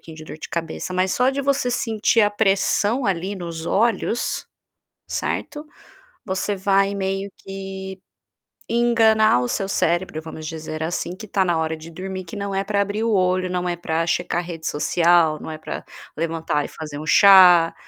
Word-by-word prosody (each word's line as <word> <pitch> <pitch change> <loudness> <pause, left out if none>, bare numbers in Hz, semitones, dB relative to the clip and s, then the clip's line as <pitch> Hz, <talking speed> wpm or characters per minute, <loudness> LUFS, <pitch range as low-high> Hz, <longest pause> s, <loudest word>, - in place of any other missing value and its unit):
de 155 - -10
dor 155 - -9
de - - -8
cabeça, 170 +2 -4
mas 185 +1 +1
só 250 +1 +3
de 275 +1 -2
você 275 -2 +1
sentir 225 -1 +1
a 205 - +4
pressão 205 +4 +1
ali 190 +1 -1
nos 170 -3 -6
olhos, 230 +4 0 0.6
certo. 295 0 -3 0.6
Você 190 +1 -1
vai 195 +1 +2
meio 195 0 -2
que 190 0 -7 0.7
enganar 225 - +4
o 125 - -1
seu 195 - -2
cérebro 175 -3 0
vamos 160 -1 -8
dizer 155 0 -6
assim 170 +2 -3
que 215 +4 -10
está 195 -1 +1
na 175 -3 +1
hora 160 0 -1
de 160 +1 -11
dormir 185 +2 -6
que 170 - -10
não 200 -1 -4
é 195 0 0
para 200 0 0
abrir 205 +2 -1
o 230 - +1
olho, 185 -1 +1
não 180 0 -1
é 175 - -2
para 165 -1 -2
checar 175 +1 -1
rede 170 -2 -7
social, 165 0 +3
não - - -7
é 155 - -6
para 155 - -6 0.3
levantar 160 -3 -1
e - - -6
fazer 150 -2 -8
um 155 - -6
chá, 180 -2 +7
185 Hz, 180 wpm, -22 LUFS, 165-200 Hz, 0.7 s, chá